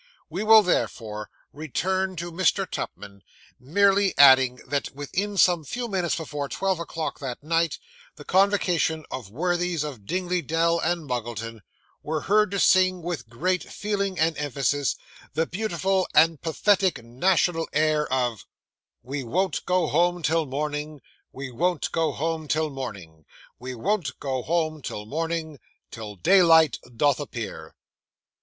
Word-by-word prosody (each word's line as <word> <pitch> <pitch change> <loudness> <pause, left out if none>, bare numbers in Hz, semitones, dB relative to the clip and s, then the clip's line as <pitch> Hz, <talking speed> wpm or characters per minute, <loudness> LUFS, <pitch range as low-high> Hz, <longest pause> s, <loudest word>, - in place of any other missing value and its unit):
We 185 +6 -3
will 220 0 +8
therefore 105 - -2 0.2
return 185 +6 -2
to 175 +1 -5
Mr. 190 +3 +1
Tupman; 100 -8 -7 0.4
merely 195 +7 +2
adding 130 -2 +7
that 140 +1 -1
within 195 +8 -3
some 175 -3 +4
few 240 - -4
minutes 185 -5 -1
before 145 -3 -4
twelve 190 -2 -1
o'clock 165 -1 -4
that 135 -1 -6
night, 165 0 +1 0.4
the 145 - -12
convocation 180 -5 +2
of 120 -7 -6
worthies 175 - -1
of 130 -10 -8
Dingley 180 -1 -1
Dell 165 +1 +1
and 170 -1 -1
Muggleton 115 -2 -4 0.4
were 155 0 -3
heard 210 +3 +3
to 200 0 -2
sing, 185 -2 +4
with 160 -9 -4
great 180 +10 0
feeling 200 -2 -3
and 160 -1 +2
emphasis, 145 -1 0 0.4
the 160 - +2
beautiful 190 -1 -1
and 160 0 +5
pathetic 185 - +1
national 165 +6 +1
air 150 -1 +1
of 125 -4 -1 0.6
'We 135 +2 -5
won't 185 +10 -1
go 180 -1 +2
home 175 +3 +1
till 160 0 +1
morning, 150 +1 -4 0.3
We 135 -1 -7
won't 175 +9 -1
go 160 -2 +1
home 160 +2 -3
till 155 +1 0
morning, 95 - -8 0.3
We 125 +1 -6
won't 170 - -2
go 130 -2 -2
home 155 0 -1
till 105 -5 -6
morning, 160 +2 -3 0.3
Till 105 -2 -8
daylight 165 - +5 0.2
doth 145 +1 +3
appear. 110 - -7
160 Hz, 140 wpm, -25 LUFS, 135-180 Hz, 0.6 s, will